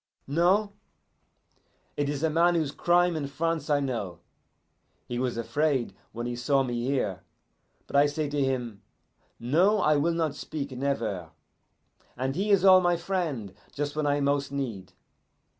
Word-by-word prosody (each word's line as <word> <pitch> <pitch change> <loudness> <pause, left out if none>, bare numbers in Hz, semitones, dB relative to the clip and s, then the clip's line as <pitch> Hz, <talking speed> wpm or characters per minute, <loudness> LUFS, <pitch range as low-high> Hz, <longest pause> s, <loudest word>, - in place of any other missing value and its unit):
No? 185 +8 +2 1.2
It 145 -1 -1
is 145 +1 -3
a 160 - +3
man 170 +2 +3
whose 155 -4 0
crime 175 +2 +2
in 145 -3 -2
France 160 +3 -2
I 145 -1 +3
know. 115 -11 -3 0.9
He 120 - -3
was 125 -2 -1
afraid 140 +2 0 0.2
when 120 +1 -5
he 120 0 -3
saw 135 +3 +2
me 120 -2 -3
here, 115 -9 -1 0.7
but - - -8
I 140 +1 +6
say 150 +1 -2
to 145 -1 0
him, 125 -6 -2 0.6
'No, 175 - +3
I 155 -6 +3
will 165 +3 +1
not 160 -3 0
speak 145 -1 -6
never'; 115 - -2 0.9
and 130 +2 -2
he 200 +4 -1
is 195 -2 +4
all 185 -1 +8
my 175 -1 +2
friend 165 - -3 0.2
just 145 0 -3
when 155 -1 0
I 145 0 +1
most 140 -1 0
need. 120 -10 -4
145 Hz, 160 wpm, -27 LUFS, 125-165 Hz, 1.2 s, all